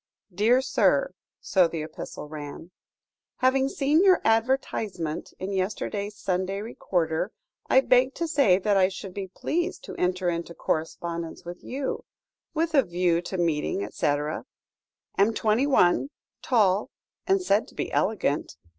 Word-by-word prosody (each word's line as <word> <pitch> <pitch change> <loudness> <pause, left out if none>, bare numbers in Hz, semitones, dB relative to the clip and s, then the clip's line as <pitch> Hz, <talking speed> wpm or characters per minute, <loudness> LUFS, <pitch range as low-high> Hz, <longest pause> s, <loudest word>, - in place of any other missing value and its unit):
"DEAR 230 +7 +3
SIR" - - +2 0.3
(so 185 -3 +3
the 165 -2 -4
epistle 155 -1 -8
ran), 150 +3 -8 0.6
"Having 265 +1 +2
seen 290 +5 +2
your 375 -2 +6
advertisement 225 - 0
in 195 +1 -4
yesterday's 200 +2 -2
Sunday 190 +1 -1
Recorder, 180 -4 -1 0.4
I 260 - +6
beg 260 0 +3
to 335 - -2
say 280 - +4
that 200 +1 +1
I 190 -1 +5
should 190 0 -7
be 195 0 -5
pleased 345 - -2
to - - -8
enter 180 0 0
into 170 0 -2
correspondence 165 +2 -3
with 175 +1 -8
you 270 +1 -3 0.5
with 325 +1 0
a 280 - +6
view 175 -3 +1
to 180 +2 -5
meeting, 155 - 0
etc. 145 - -1 0.7
Am 215 +3 +4
twenty 225 +6 +2
one, 260 -1 +3 0.3
tall, 210 -5 +2 0.4
and 385 +1 +4
said 220 - +1
to - - -17
be - - -3
elegant. 190 -8 0
195 Hz, 140 wpm, -26 LUFS, 175-255 Hz, 0.7 s, your